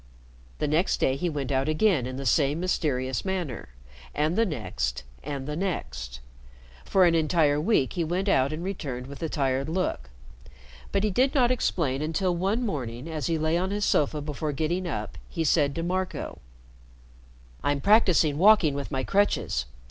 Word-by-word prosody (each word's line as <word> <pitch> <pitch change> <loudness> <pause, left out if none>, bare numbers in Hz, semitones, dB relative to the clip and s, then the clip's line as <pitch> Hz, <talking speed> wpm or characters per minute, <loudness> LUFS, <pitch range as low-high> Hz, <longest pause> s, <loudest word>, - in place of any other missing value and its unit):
The - - -1
next 160 +6 +1
day 130 - +2
he 175 +5 -1
went 145 -3 -3
out 135 +2 +1
again 155 - +2
in 130 - -5
the 135 - -5
same 145 +4 +2
mysterious 130 -8 -1
manner, 175 - -3 0.5
and 155 +3 +1
the 225 +1 +3
next - - -3 0.2
and 140 -1 -5
the 150 - -3
next. - - -4 0.6
For 190 -2 +4
an 170 - +4
entire 155 -2 +2
week 170 - +2
he 175 - -1
went 180 +5 -1
out 135 -7 +3
and 155 +2 -4
returned 140 -10 -4
with 140 +1 -9
the 165 - -3
tired 135 -1 0
look; 160 - -2 0.8
but 195 - +1
he 215 - +1
did 260 +9 +2
not 250 -3 +4
explain 155 - 0
until 175 +4 0
one 200 +8 0
morning, 125 - -4
as 155 -4 -3
he 165 - +1
lay 160 +2 +1
on 185 +1 -1
his 205 0 -1
sofa 150 0 +1
before 150 0 -3
getting 170 +5 -1
up, - - -4
he 165 - -2
said 145 -3 +2
to 165 - -2
Marco: 185 +2 -3 1.2
"I'm 145 0 +1
practicing 175 -6 +4
walking 195 -6 +6
with 140 0 -4
my 130 -2 -2
crutches. 195 - +1
155 Hz, 175 wpm, -26 LUFS, 140-185 Hz, 1.2 s, walking